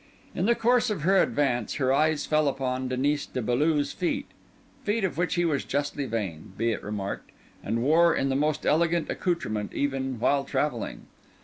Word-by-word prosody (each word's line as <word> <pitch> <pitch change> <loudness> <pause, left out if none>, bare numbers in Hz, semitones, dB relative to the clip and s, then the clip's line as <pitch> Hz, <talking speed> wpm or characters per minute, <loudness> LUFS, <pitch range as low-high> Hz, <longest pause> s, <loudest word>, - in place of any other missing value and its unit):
In 180 - 0
the 235 - +4
course 240 0 +3
of 200 -8 -3
her 190 +3 +5
advance, 125 -6 0
her 130 -2 +2
eyes 155 +1 +2
fell 155 -1 +2
upon 130 -1 -1
Denis 140 +3 0
de - - -4
Beaulieu's 145 +5 +1
feet—feet 205 +4 -4
of 190 - 0
which 175 +2 0
he 175 -1 +2
was 150 -4 0
justly 145 0 -2
vain, 95 -7 -4
be 115 +1 +1
it 110 - -3
remarked, 100 -1 -5 0.3
and 115 +1 -1
wore 165 +4 +5
in 135 - 0
the 135 - 0
most 150 +2 0
elegant 170 +1 +2
accoutrement 110 - -2
even 135 -3 -1
while 140 +4 +2
travelling. 135 -4 -2
145 Hz, 175 wpm, -27 LUFS, 125-165 Hz, 0.3 s, her